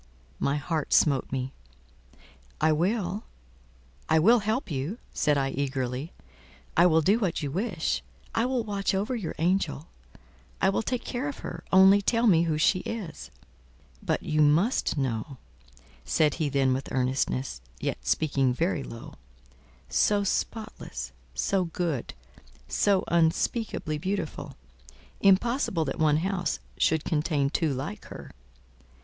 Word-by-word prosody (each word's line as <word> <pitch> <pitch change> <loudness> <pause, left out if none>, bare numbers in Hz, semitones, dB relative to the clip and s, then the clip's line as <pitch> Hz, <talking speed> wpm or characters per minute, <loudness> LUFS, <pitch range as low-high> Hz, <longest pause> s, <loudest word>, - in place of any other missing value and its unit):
My 140 - +1
heart 150 +1 -2
smote 140 -4 +3
me. 130 0 -3 1.1
"I 160 - +4
will—I 65 - -3
will 225 +10 +6
help 215 - -2
you," 145 - -3 0.2
said 150 -1 +2
I 135 -1 0
eagerly. 135 +1 -2 0.6
"I 175 - +6
will 160 -1 +4
do 200 +8 +3
what 185 -7 -1
you 140 - -2
wish. 175 - -1 0.3
I 230 +2 +1
will 255 -2 0
watch 200 -2 -1
over 210 +7 -1
your 205 -9 -4
angel; 165 -3 0 0.7
I 190 - +3
will 195 - +1
take 245 +2 -3
care 255 +3 -3
of 280 - -6
her, - - -6
only 190 +2 +7
tell 230 +3 +2
me 170 -6 +5
who 155 -2 0
she 185 +4 +3
is." 180 - -6 0.7
"But - - -1
you 155 0 +1
must 160 - +3
know," 130 0 -2 0.7
said 150 - +2
he 150 - +1
then 135 -2 +2
with 130 +1 -4
earnestness, 130 - -1 0.2
yet - - -2
speaking 135 - +1
very 165 0 0
low. 115 -3 -9 0.7
"So 200 - +2
spotless, 215 - -3 0.2
so 185 - +1
good, 165 -6 -3 0.5
so 190 - +2
unspeakably 165 0 0
beautiful! 160 -6 -4 0.6
impossible 195 - +3
that 135 - -4
one 150 -1 +4
house 190 -2 -1 0.2
should 160 -1 +2
contain 150 -3 0
two 160 -2 +1
like 130 -5 -5
her. - - -10
160 Hz, 135 wpm, -27 LUFS, 135-195 Hz, 1.1 s, only